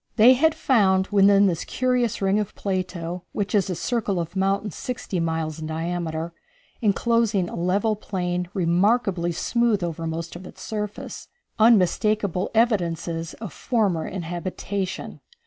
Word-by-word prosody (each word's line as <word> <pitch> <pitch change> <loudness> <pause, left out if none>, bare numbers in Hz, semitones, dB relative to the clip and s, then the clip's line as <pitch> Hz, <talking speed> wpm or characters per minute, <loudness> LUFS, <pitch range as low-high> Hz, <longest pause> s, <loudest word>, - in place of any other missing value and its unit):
They 235 +3 +8
had 315 +5 +3
found 190 -7 +3
within 200 0 +5
this 175 -4 0
curious 250 -4 0
ring 195 +2 +3
of 210 - -4
Plato, 180 -2 -3
which 205 -1 -2
is 200 -3 +2
a 180 - -1
circle 210 -2 -1
of 170 +2 -5
mountains 195 0 0
sixty 235 -7 -4
miles 160 -1 -2
in 155 - -5
diameter, 165 0 -3 0.5
enclosing 220 -2 +2
a - - -7
level 195 +5 +1
plain 180 -3 -3
remarkably 185 0 +2
smooth 230 +3 +1
over 165 -1 -3
most 165 +1 -4
of 180 +1 -9
its - - -12
surface, 210 -1 -5 0.3
unmistakable 210 -2 +3
evidences 170 -7 0
of 210 -9 -8
former 205 -10 0
inhabitation. 185 +2 -4
190 Hz, 135 wpm, -24 LUFS, 170-215 Hz, 0.5 s, They